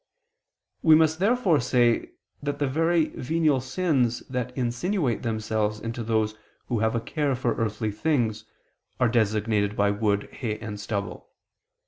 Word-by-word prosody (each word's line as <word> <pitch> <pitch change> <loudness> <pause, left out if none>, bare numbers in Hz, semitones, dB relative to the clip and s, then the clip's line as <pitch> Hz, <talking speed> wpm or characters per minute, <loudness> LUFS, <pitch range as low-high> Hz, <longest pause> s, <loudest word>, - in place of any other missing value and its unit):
We 160 -1 +7
must 160 0 +3
therefore 200 - +3
say 120 -2 +2 0.3
that 145 0 -2
the 145 - 0
very 165 +3 +2
venial 155 -1 +1
sins 130 -4 0
that 125 -1 -2
insinuate 130 - 0
themselves 110 -2 -1
into 115 +1 -4
those 110 -1 0 0.4
who 120 - 0
have 110 +1 +1
a - - +2
care 145 +2 -1
for 120 -2 0
earthly 110 -1 -2
things, 115 -2 0 0.5
are 125 - +4
designated 110 -2 +1
by 100 -1 +2
wood, 105 -1 0
hay, 110 -5 -4
and 105 -2 -7
stubble. 100 -1 -4
120 Hz, 140 wpm, -26 LUFS, 110-145 Hz, 0.5 s, We